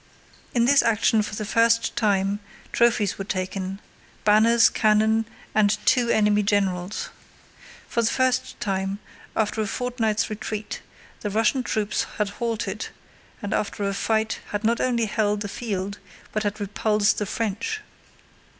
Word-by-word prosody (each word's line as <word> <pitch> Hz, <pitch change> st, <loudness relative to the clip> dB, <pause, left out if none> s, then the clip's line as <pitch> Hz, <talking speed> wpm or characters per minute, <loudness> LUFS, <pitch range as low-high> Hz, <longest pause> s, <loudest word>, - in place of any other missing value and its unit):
In 235 Hz, -1 st, +4 dB
this 280 Hz, +2 st, +6 dB
action 225 Hz, 0 st, +3 dB
for 210 Hz, 0 st, -4 dB
the 215 Hz, -, -3 dB
first 230 Hz, +2 st, +3 dB
time 200 Hz, -2 st, +1 dB, 0.3 s
trophies 220 Hz, -5 st, +2 dB
were -, -, -2 dB
taken: 190 Hz, 0 st, -3 dB, 0.4 s
banners, 225 Hz, +2 st, +6 dB
cannon, 220 Hz, +1 st, +3 dB, 0.3 s
and 210 Hz, -1 st, +3 dB
two 245 Hz, -2 st, +3 dB
enemy 210 Hz, -1 st, +3 dB
generals. 195 Hz, -2 st, 0 dB, 0.8 s
For 235 Hz, -, 0 dB
the 230 Hz, -, +2 dB
first 260 Hz, -1 st, 0 dB
time, 195 Hz, -1 st, -1 dB, 0.4 s
after 220 Hz, 0 st, 0 dB
a 215 Hz, -, -1 dB
fortnight's 230 Hz, -3 st, 0 dB
retreat, 215 Hz, 0 st, -5 dB, 0.4 s
the 210 Hz, -, -3 dB
Russian 225 Hz, +5 st, +2 dB
troops 210 Hz, -4 st, -1 dB
had 210 Hz, -2 st, 0 dB
halted 215 Hz, -2 st, -3 dB, 0.6 s
and 200 Hz, -, -2 dB
after 205 Hz, 0 st, -1 dB
a 200 Hz, -, -1 dB
fight 220 Hz, +2 st, 0 dB
had 205 Hz, +1 st, -3 dB
not 230 Hz, +2 st, +2 dB
only 240 Hz, -3 st, +1 dB
held 210 Hz, -1 st, 0 dB
the 205 Hz, -, -2 dB
field 200 Hz, -2 st, -4 dB, 0.3 s
but 215 Hz, -, -1 dB
had 205 Hz, 0 st, -2 dB
repulsed 210 Hz, +1 st, +1 dB
the 210 Hz, -, -2 dB
French. 230 Hz, -, -2 dB
215 Hz, 140 wpm, -24 LUFS, 205-230 Hz, 0.8 s, this